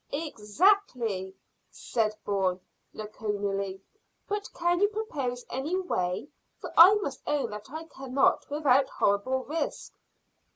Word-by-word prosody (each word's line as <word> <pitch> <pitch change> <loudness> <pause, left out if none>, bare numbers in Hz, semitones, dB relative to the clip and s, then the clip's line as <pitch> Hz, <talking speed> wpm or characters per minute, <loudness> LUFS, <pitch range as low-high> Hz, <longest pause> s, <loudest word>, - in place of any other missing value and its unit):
"Exactly," 250 - +1 0.3
said 215 -2 -1
Bourne 190 -2 0 0.3
laconically; 200 -2 -4 0.4
"but 410 0 -3
can 345 0 +1
you 410 - +5
propose 290 - -4
any 290 +8 -2
way? 180 - -2 0.3
For - - -8
I 365 +5 +10
must 280 -11 -3
own 295 -5 0
that 210 0 -8
I 315 +3 -6
cannot 270 -4 0
without 280 -2 +3
horrible 230 +7 +1
risk." 315 +5 -4
260 Hz, 115 wpm, -28 LUFS, 205-325 Hz, 0.4 s, I